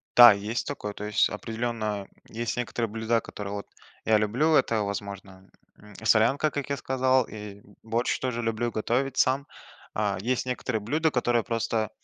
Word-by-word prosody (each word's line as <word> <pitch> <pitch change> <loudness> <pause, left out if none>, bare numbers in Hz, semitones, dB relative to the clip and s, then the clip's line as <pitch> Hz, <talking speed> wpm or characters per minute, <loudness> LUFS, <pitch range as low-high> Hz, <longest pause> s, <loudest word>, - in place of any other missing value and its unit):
да, 120 -1 +11
есть 105 +4 -3
такое. 105 -7 -4
То 105 - -6
есть 105 0 +3
определенно 110 -2 -3 0.2
есть 115 +1 -3
некоторые 120 -2 -2
блюда, 115 +2 0
которые 100 -1 -7
вот, 100 0 -5 0.4
я 110 -1 +5
люблю. 120 +10 +2
Это, 110 -6 +2
возможно, 100 -2 -6 0.3
м, 105 -1 -16
солянка, 120 +7 +4
как 145 0 -4
я 140 - -1
сказал, 130 -1 +2
и 105 -2 -9 0.2
борщ 115 +2 -1
тоже 125 -2 -2
люблю 115 +1 -1
готовить 125 +5 -1
сам. 135 +2 +2 0.5
А 105 -3 0
есть 125 +4 0
некоторые 125 -3 -2
блюда, 155 +9 +1
которые 120 -2 +1
просто 115 -2 -1
115 Hz, 160 wpm, -27 LUFS, 105-125 Hz, 0.5 s, да